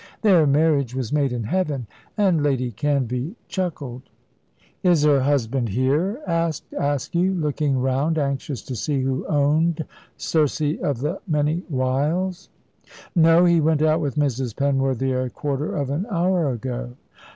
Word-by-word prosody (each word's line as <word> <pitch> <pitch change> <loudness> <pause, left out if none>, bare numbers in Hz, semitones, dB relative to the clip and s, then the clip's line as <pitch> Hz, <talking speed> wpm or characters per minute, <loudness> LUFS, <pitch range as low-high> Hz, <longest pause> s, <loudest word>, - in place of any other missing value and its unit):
Their 180 -8 +5
marriage 140 -3 +2
was 130 -1 -3
made 140 -3 +2
in 120 -2 -3
heaven"; 145 - -1 0.3
and 190 -7 +3
Lady 130 -4 0
Canvey 135 - -1
chuckled. 165 -9 -4 0.8
"Is 175 -5 +3
her 145 -2 +5
husband 130 -3 0
here?" 145 - 0
asked 165 -2 -1
Askew, 155 +7 0
looking 150 -4 0
round, 135 +5 0
anxious 140 -4 -2
to 130 - -6
see 140 +4 -1
who 130 0 -2
owned 155 +2 +1 0.3
Circe 155 -3 0 0.2
of 135 -4 -1
the 155 +7 -2
many 155 +2 0
wiles. 155 +8 -1 0.7
"No; 165 +1 +6
he 170 -2 +4
went 155 0 +2
out 155 +1 +3
with 145 -4 -2
Mrs. 135 -5 -1
Penworthy 135 -2 0
a 130 0 -1
quarter 145 +2 -3
of 140 -2 -2
an 170 +9 -2
hour 175 -4 +1
ago." 120 +1 -5
145 Hz, 140 wpm, -23 LUFS, 130-165 Hz, 0.8 s, No